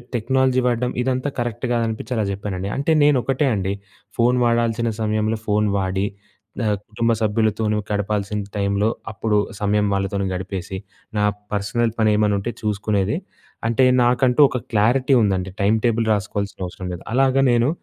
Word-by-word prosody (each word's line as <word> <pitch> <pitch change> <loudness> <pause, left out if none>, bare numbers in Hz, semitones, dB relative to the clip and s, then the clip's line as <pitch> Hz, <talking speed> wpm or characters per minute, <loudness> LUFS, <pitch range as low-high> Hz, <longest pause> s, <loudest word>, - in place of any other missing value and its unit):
Technology 130 +2 +2
వాడడం, 125 0 0
ఇదంతా 130 +2 0
correct 120 0 -2
గాదనిపిచ్చి 115 +1 -2
అలా 110 - +1
జెప్పానండి. 100 -1 -4
అంటే, 140 +4 0
నేనొకటే 135 0 +2
అండి, 95 0 -1 0.4
ఫోను 125 +1 +3
వాడాల్సిన 115 0 +1
సమయంలో 110 +1 0
ఫోను 105 -1 +1
వాడి, 95 0 0 0.6
ఆహ్, 105 -1 +1
కుటుంబ 115 +2 0
సభ్యులతో 110 0 +1
నువ్వు 105 -1 -2
గడపాల్సిన 105 0 -1 0.2
టైంలో, 100 +1 +1 0.2
అప్పుడు 105 +1 0 0.2
సమయం 105 0 +2
వాళ్ళతోని 100 0 -1
గడిపేసి, 95 0 -5 0.4
నా 105 - +3 0.3
పర్సనల్ 110 +3 0
పనేమన్నుంటే 105 0 +2
చూసుకునేది. 105 +2 0 0.5
అంటే, 125 +3 +3 0.2
నాకంటూ 125 +2 +3
ఒక - - -1 0.2
క్లారిటీ 125 +6 +3
ఉందండి, 95 -2 0
టైమ్ 105 +3 +3
టేబుల్ 115 -1 +1
రాసుకోవాల్సినవసరం 100 -2 -4
లేదు. 90 - -8
అలాగ 135 +1 +3 0.2
నేను, 120 +2 +3
110 Hz, 135 wpm, -21 LUFS, 100-120 Hz, 0.6 s, ఫోను